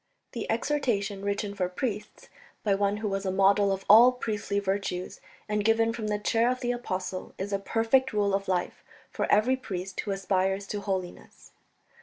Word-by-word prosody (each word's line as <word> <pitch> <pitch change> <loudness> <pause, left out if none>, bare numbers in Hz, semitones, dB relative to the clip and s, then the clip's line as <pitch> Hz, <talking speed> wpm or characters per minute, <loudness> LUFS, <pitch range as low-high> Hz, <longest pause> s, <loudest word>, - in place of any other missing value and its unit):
The - - -5
exhortation, 210 -9 -1
written 200 0 -2
for 185 -3 -1
priests, 210 +3 -5 0.4
by 205 - +2
one 200 +1 +1
who 215 0 -3
was 195 -1 -2
a 190 - -1
model 195 +1 +4
of 195 0 -3
all 230 +5 +9
priestly 215 -5 -3
virtues, 195 -2 -3 0.3
and 210 -1 0
given 225 +1 +3
from 225 -2 -4
the 210 0 0
chair 225 +3 +2
of 255 0 -2
the 245 -1 0
Apostle, 190 -6 -4
is 200 +2 -4
a 200 - +1
perfect 230 +6 +2
rule 205 -2 +1
of 195 0 -1
life 180 -1 -2 0.3
for - - -2
every 225 +5 +4
priest 190 -7 -6
who - - -3
aspires 195 0 0
to 205 - -3
holiness. 190 -3 -5
200 Hz, 180 wpm, -28 LUFS, 195-225 Hz, 0.4 s, all